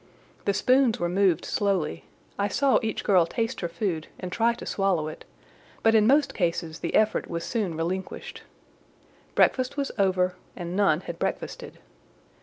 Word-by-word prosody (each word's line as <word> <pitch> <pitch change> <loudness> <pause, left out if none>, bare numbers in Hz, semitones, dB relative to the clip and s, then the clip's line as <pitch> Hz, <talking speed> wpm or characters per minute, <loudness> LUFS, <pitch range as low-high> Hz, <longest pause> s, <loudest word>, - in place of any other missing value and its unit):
The 200 - +2
spoons 250 +2 +3
were 175 - 0
moved 185 -2 +2
slowly: 195 -7 -1 0.3
I 200 - +2
saw 270 +7 +3
each 220 -1 -3
girl 180 -4 +4
taste 230 +6 -2
her 170 - -1
food 170 -2 -2
and 180 - -5
try 235 +4 +2
to - - -9
swallow 190 -6 0
it; 155 - -9 0.6
but 225 - +5
in 215 -1 +5
most 280 +1 +4
cases 170 -3 -2
the - - -3
effort 215 0 +2
was 170 -1 -3
soon 195 -6 -2
relinquished. 180 +3 -4 0.9
Breakfast 255 +2 +2
was 280 -1 -1
over, 185 -2 +2 0.2
and 175 0 -5
none 190 -5 +3
had 170 -2 -7
breakfasted. - - -4
195 Hz, 160 wpm, -26 LUFS, 170-225 Hz, 0.9 s, but